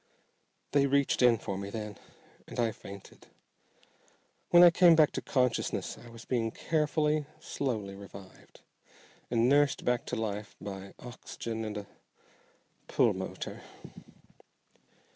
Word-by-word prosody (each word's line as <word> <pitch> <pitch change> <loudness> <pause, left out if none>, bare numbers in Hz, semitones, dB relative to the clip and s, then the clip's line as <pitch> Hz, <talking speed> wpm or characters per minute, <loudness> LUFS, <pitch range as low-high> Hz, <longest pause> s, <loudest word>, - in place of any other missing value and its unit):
"They 140 -1 +4
reached 140 -1 +2
in 120 -2 +6
for 100 -3 -4
me 100 0 -5
then, 105 -1 -6 0.5
and - - -7
I 115 -2 +2
fainted. 100 -2 -12 1.2
When 175 0 +8
I 175 - +9
came 170 -1 +7
back 155 -2 +5
to - - -3
consciousness 125 -3 0
I 120 - -13
was 115 -1 -12
being 115 -3 0
carefully, 150 +1 0
slowly 110 -10 -3
revived, 100 -1 -13 0.7
and 115 0 +3
nursed 145 +1 +3
back 125 -1 0
to - - -2
life 105 -1 -4
by 95 -1 -8
oxygen 115 -2 -6
and 110 -1 -4
a 100 -1 -6 1.0
pulmotor." - - -1
115 Hz, 125 wpm, -30 LUFS, 105-140 Hz, 1.2 s, I